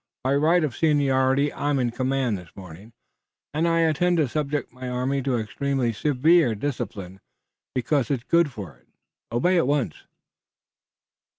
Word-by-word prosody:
By 130 +2 +1
right 160 +4 +3
of 140 -7 -2
seniority 140 -2 +2
I'm 145 0 -1
in 125 -2 0
command 130 -1 -1
this 90 -3 -9
morning, 95 +4 -12 0.6
and 160 +3 +1
I 165 0 +2
intend 170 +2 +2
to 155 -4 +2
subject 145 -1 -3
my 130 0 -7
army 130 +2 -1
to 130 -2 0
extremely 125 +2 -1
severe 145 +1 +3
discipline, 100 -6 -5 0.6
because 130 0 0
it's 130 -4 -1
good 170 +1 +2
for 95 - -9
it. - - -32 0.4
Obey 175 +11 +2
at 165 - +2
once!" 145 -3 -2
135 Hz, 150 wpm, -24 LUFS, 120-150 Hz, 0.6 s, right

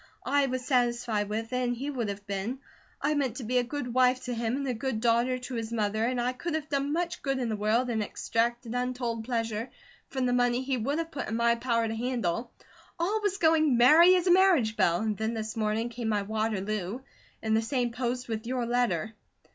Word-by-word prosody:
I 285 -1 +2
was 255 -1 -3
satisfied 240 -5 +1
with 225 +3 -3
it, - - +1
and 245 -1 0
he 275 +5 -4
would 240 -6 -2
have 200 0 -6
been. 200 +6 -3 0.5
I 295 +2 +2
meant 270 -6 0
to 260 - -5
be 250 +3 +1
a - - +1
good 250 -1 -4
wife 255 0 +3
to 250 - -3
him 230 +1 -1
and 275 0 -3
a 255 - 0
good 240 0 -2
daughter 240 +2 +2
to 250 +1 -8
his 230 -1 -3
mother, 215 -1 0
and 250 +1 0
I 245 +1 0
could 320 +6 -3
have 310 -1 -4
done 280 0 0
much 340 +2 -2
good 270 -1 -1
in 245 -3 -1
the 215 - -1
world 215 +4 +1
and 220 -2 0
extracted 235 +3 -1
untold 245 -2 -2
pleasure 230 -1 -2 0.4
from 260 -2 -2
the 245 - +1
money 245 0 +2
he 265 0 0
would 265 +5 -1
have 330 0 -3
put 280 - -4
in 225 - -2
my 235 0 +3
power 230 -1 0
to 220 - -3
handle. 235 -2 -2 0.5
All 410 +6 0
was 405 -2 0
going 315 -6 +4
'merry 320 +9 +7
as 360 -1 +1
a 360 - +4
marriage 350 - +4
bell,' 170 -2 +2
and 215 -1 0
then 220 +2 -2
this 220 -1 -4
morning 220 +1 0
came 235 -1 -4
my 205 -2 +1
Waterloo, 215 0 -2 0.4
in 220 -1 +1
the 220 - +3
same 245 +1 -1
post 245 +1 -3
with 225 0 -4
your 250 -1 -1
letter." 240 -2 0
240 Hz, 225 wpm, -28 LUFS, 225-260 Hz, 0.5 s, merry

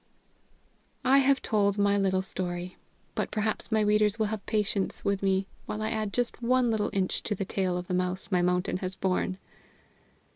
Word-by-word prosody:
I 270 +2 +6
have 275 0 +3
told 205 -2 +2
my 200 0 +3
little 190 -1 +1
story. 180 -1 -4 0.4
But - - -1
perhaps 215 +1 -2
my 220 0 +3
readers 210 0 +3
will 220 - +1
have 215 - -5
patience 210 -2 -1
with 200 -1 +1
me 195 0 +2 0.2
while 215 0 -3
I 215 - -1
add 215 -2 -1
just 245 +3 -1
one 245 0 +3
little 215 -2 0
inch 190 -2 0
to 210 - -2
the 195 - -3
tail 185 -1 -1
of 180 - -4
the 180 - -4
mouse 180 +2 -1
my 180 -2 +3
mountain 180 +1 +1
has 185 0 -4
borne. 185 0 0
200 Hz, 185 wpm, -28 LUFS, 185-215 Hz, 0.4 s, I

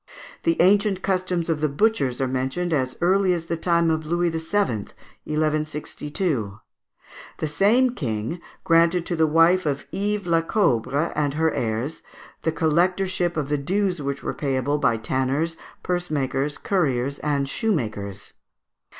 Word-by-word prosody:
The 335 -1 +1
ancient 200 0 +3
customs 185 -3 0
of 160 -3 -1
the 155 - +2
butchers 140 - +1
are 135 - +1
mentioned 135 +7 -1
as 130 -3 -1
early 185 +1 +3
as 165 -1 -5
the 170 - -2
time 170 0 +2
of 160 0 -1
Louis 170 +2 0
VII., 165 - -2 0.9
1162. 150 - -2 0.8
The 155 - -2
same 210 +11 +3
king 120 - -3 0.2
granted 170 +1 +3
to 175 - -1
the 160 -1 +3
wife 165 +3 +4
of 140 -1 -2
Ives 205 0 -1
Laccobre 165 - +1
and 145 -1 0
her 160 +1 +1
heirs 115 +6 -2 0.4
the 160 - 0
collectorship 175 +2 +1
of 145 -2 -2
the 150 -1 0
dues 185 +3 0
which 140 0 -4
were - - -2
payable 140 +1 -1
by 115 -5 +2
tanners, 130 +8 -1 0.3
purse 180 -1 -1
makers, 140 0 -1
curriers, 140 -7 0
and 145 -2 0
shoemakers. 110 - -2
160 Hz, 140 wpm, -23 LUFS, 140-180 Hz, 0.9 s, wife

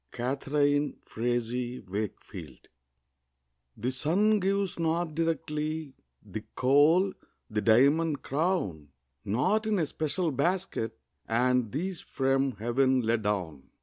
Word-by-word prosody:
Catharine 145 +3 0
Frazee 120 +1 -2
Wakefield. 95 - -7 1.1
The 125 +4 -1
sun 200 +11 +2
gives 195 -1 0
not 165 0 0
directly 155 -2 -2 0.3
The 110 - -6
coal, 150 +9 +4 0.4
the 105 0 0
diamond 140 +8 +4
crown; 140 - -1 0.4
Not 130 - +1
in 215 -1 +2
a 165 - +2
special 155 +3 -1
basket 140 - -1 0.3
Are 125 +3 +3
these 145 - -1
from 135 0 0
Heaven 130 +4 +2
let 115 0 +1
down. 90 -9 -3
135 Hz, 105 wpm, -29 LUFS, 115-165 Hz, 1.1 s, coal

